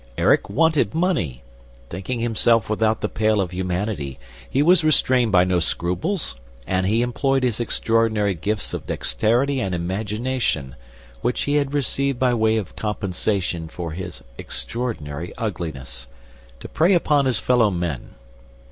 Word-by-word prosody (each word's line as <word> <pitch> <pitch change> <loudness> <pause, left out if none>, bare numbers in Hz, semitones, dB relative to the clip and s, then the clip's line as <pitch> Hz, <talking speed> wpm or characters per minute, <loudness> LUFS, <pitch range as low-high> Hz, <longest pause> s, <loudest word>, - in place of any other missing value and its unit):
"Erik - - +3
wanted 160 0 +2
money. 155 - 0 0.5
Thinking 100 +7 -4
himself 115 -1 +2
without 110 +1 +1
the 105 - 0
pale 110 0 +1
of 90 -3 -1
humanity, 90 - -3 0.3
he 140 - +2
was 175 +1 +5
restrained 130 -6 +4
by 90 -2 +5
no 90 -1 +1
scruples 90 - -1 0.3
and 95 0 0
he 115 +4 +2
employed 135 +2 0
his 120 -3 0
extraordinary 115 -3 +1
gifts 105 +5 -3
of - - -5
dexterity 120 - +1
and 95 -6 -1
imagination, 100 - -2 0.5
which 125 - 0
he 145 +1 +1
had 145 0 -1
received 140 -1 0
by 125 0 +2
way 110 -1 +2
of 100 -5 -5
compensation 95 -4 -2
for 85 +1 -6
his 90 -6 -7 0.2
extraordinary 90 -10 -4
uglinesss, 80 - -5 0.5
to - - -8
prey 170 +5 +3
upon 150 -5 +3
his 125 -4 +2
fellow 120 -4 +3
men. 85 -8 -4
110 Hz, 140 wpm, -22 LUFS, 90-125 Hz, 0.5 s, was